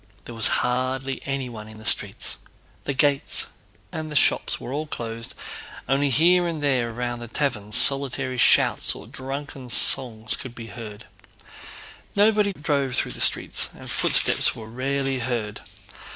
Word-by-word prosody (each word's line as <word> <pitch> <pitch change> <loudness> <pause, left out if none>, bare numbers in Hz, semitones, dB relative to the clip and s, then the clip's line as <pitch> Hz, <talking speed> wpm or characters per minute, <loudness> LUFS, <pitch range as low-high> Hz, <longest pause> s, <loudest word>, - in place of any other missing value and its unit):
There 120 - -8
was 115 -2 +5 0.2
hardly 130 +1 -2
anyone 125 -6 -4
in 110 0 -12
the 110 - -12
streets. - - -1 0.5
The 140 - -1
gates 140 +1 +1 0.5
and 155 -2 -3
shops - - +1
were 125 - -7
all 155 +2 -3
closed, 115 -4 -6 0.5
only 140 +2 +1
here 175 +6 +4
and 160 -3 -4
there 125 -5 +1
round 120 +1 -4
the 120 - -7
taverns 110 -5 -2
solitary 130 -1 +2
shouts - - +4
or - - -10
drunken 135 -1 -7
songs 110 -1 +3
could 125 -3 -9
be 115 -2 -9
heard. 105 -1 -9 1.1
Nobody 205 0 +3
drove 140 -6 -1
through - - 0
the - - -7
streets - - +3
and - - -8
footsteps - - +5
were 110 - -9
rarely 135 +3 -2
heard. 115 -4 -3
130 Hz, 145 wpm, -24 LUFS, 115-140 Hz, 1.1 s, was